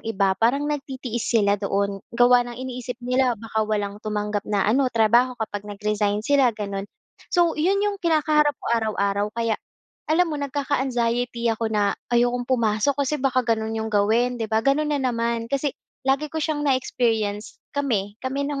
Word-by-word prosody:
iba 195 -3 +2
parang 265 +6 +2
nagtitiis 265 -5 -3
sila 205 -3 +2
doon. 200 0 -1 0.2
Gawa 245 0 +6
ng 240 - -8
iniisip 250 -1 -5
nila 250 -1 +2
baka 220 0 -3
walang 205 -1 -2
tumanggap 210 -1 -3
na 205 -2 +1
ano 255 +5 +3
trabaho 240 +2 +3
kapag 210 -2 -5
nag-resign 210 0 -1
sila 265 -5 +3
gano'n. 200 -1 -4 0.4
So 345 -2 +3
yun 390 +6 +1
yung 405 -1 -2
kinakaharap 305 -3 +2
ko - - -11
araw-araw 205 -1 0
kaya 230 -2 0 0.5
alam 340 +3 +4
mo 290 - -3
nagkaka-anxiety 245 -4 -1
ako 225 0 -2
na 210 -2 +1 0.2
ayokong 245 +1 +1
pumasok 235 +2 +1
kasi 295 +1 -2
baka 255 -2 +1
gano'n 225 -1 -1
yung 220 0 -3
gawin, 230 +4 +2
di 220 - -2
ba, 220 0 +1
gano'n 295 +2 +2
na - - +2
naman, 235 -2 -1
kasi 275 0 0 0.3
lagi 275 +3 +2
ko 320 - -2
siyang 295 -1 -1
na-experience 225 -5 0 0.2
kami, 210 -8 -1
kami 270 +2 -2
ng 285 -1 -3
235 Hz, 165 wpm, -23 LUFS, 215-270 Hz, 0.5 s, Gawa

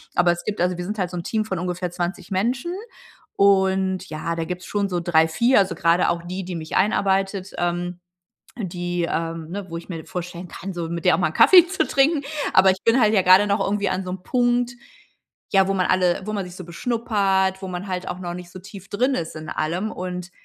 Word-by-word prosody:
Aber 175 0 +4
es 175 - -4
gibt 210 -3 -4
also, 180 0 +1
wir 175 - -4
sind 210 +3 -4
halt 180 -3 -2
so 180 - -5
'n 170 - -4
Team 215 +4 -1
von 190 -5 -3
ungefähr 180 0 -3
20 175 +2 -4
Menschen 240 - -1 0.6
und 190 -1 +2
ja, 160 +2 -3
da 165 0 -2
gibt's 180 +1 -5
schon 200 -1 -1
so 180 -2 -1
3, 160 -2 +3
4, 235 +9 +3
also, 190 -3 +1
gerade 170 +2 +3
auch 170 0 -1
die, 185 +2 -5
die 180 -1 -5
mich 160 -1 -5
einarbeitet, 195 -1 +1
ähm, 175 0 -2 0.6
die 175 -4 -3
ähm 165 -1 -3
ne, 195 +2 -5
wo 165 - -5
ich 170 - -11
mir 165 -3 -6
vorstellen 180 0 -6
kann, 190 +3 -7
so 170 -2 -4
mit 170 0 -4
der 180 - +6
auch - - -3
mal 180 - +2
'n - - -10
Kaffee 360 -2 +8
zu 380 +2 0
trinken. 285 +2 +3 0.3
Aber 190 0 +6
ich 185 - -6
bin 230 +3 +4
halt 215 -1 +4
ja 200 - +5
gerade 185 +3 +6
noch 200 +1 +1
irgendwie 200 0 0
an 185 0 -2
so 180 - -4
'nem 185 0 -6
Punkt, 245 0 +1 0.8
ja, 195 -1 +5
wo 195 - +1
man 185 -2 +1
alle 185 -1 +2
wo 215 - -4
man 200 -3 -2
sich 180 0 -10
so 185 -2 -9
beschnuppert, 195 -2 0
wo 190 - -5
man 180 +2 -5
halt 185 -1 -4
auch 180 - -5
noch 175 -1 -5
nicht 180 -1 -9
so 185 - -9
tief 195 +1 -12
drin 255 +6 +1
ist 165 0 -4
in 155 - -8
allem. 175 +7 -2
Und, 180 0 -6
185 Hz, 240 wpm, -23 LUFS, 175-200 Hz, 0.8 s, Kaffee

